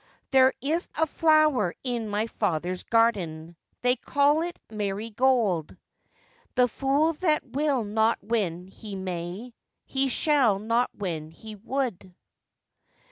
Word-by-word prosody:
'There 260 -1 +6
is 315 +6 -1
a 320 - +2
flower 310 - +3
in 240 -4 -2
my 205 +1 0
father's 180 -5 -2
garden, 175 -8 0 0.3
They 250 0 +4
call 285 +4 +2
it 345 +1 -4
marygold; 210 - 0 0.8
The 250 -1 +4
fool 280 +6 +1
that 310 -1 0
will 280 -3 0
not 220 +2 +1
when 190 -6 -2
he 200 +2 -9
may, 185 +5 -5 0.3
He 270 0 0
shall 265 -5 +3
not 230 +4 +1
when 165 -6 -4
he 215 +7 -11
wold. 225 -4 -3
230 Hz, 120 wpm, -26 LUFS, 195-270 Hz, 0.8 s, There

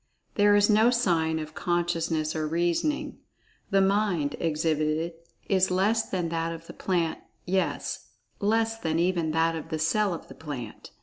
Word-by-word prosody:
There 205 0 +4
is 205 0 +5
no 220 +2 +5
sign 170 -10 +1
of 155 0 -6
"consciousness" 165 -3 -1
or 155 -1 -1
"reasoning"—the 175 - -2
Mind 195 -7 +1
exhibited 155 0 0 0.3
is 190 -1 +3
less 200 +5 +1
than 180 -3 -1
that 165 0 -1
of 165 0 -8
the - - -10
plant, 170 -4 -1 0.3
yes, 190 +1 -1 0.3
less 225 +2 +1
than 160 -4 -1
even 170 -1 +1
that 165 +1 +1
of 160 0 -6
the 160 - -2
cell 195 +6 +1
of - - -10
the - - -11
plant. 135 -8 -7
170 Hz, 150 wpm, -27 LUFS, 160-195 Hz, 0.3 s, is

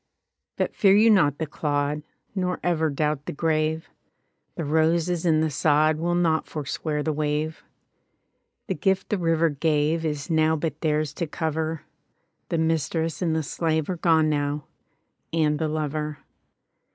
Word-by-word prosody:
E68| - - -56
But - - -1
fear 195 -1 +5
you 220 +2 +6
not 145 -9 +4
the 160 - -2
clod, 145 0 -1 0.3
Nor 180 -2 -1
ever 160 -3 +1
doubt 150 0 -1
the - - -2
grave: 155 +1 0 0.7
The 165 - -3
roses 165 +3 +1
and 160 -1 +3
the 160 - 0
sod 155 +1 +3
Will 175 +2 0
not 165 -2 +1
forswear 150 0 -3
the 155 - 0
wave. 150 +1 -2 1.0
The - - -1
gift 190 +5 0
the 210 - 0
river 165 -1 +2
gave 155 +2 +1
Is 150 -3 -2
now 160 -1 +3
but 155 -1 -3
theirs 150 -2 0
to 170 - -3
cover: 160 +1 -2 0.7
The 170 - 0
mistress 160 0 0
and 165 -3 +1
the 160 - 0
slave 160 +2 -1
Are 180 - -3
gone 160 -2 +3
now, 145 -1 -1 0.7
and 155 -2 +1
the 160 - 0
lover. 150 -1 -2
155 Hz, 155 wpm, -25 LUFS, 150-165 Hz, 1.0 s, you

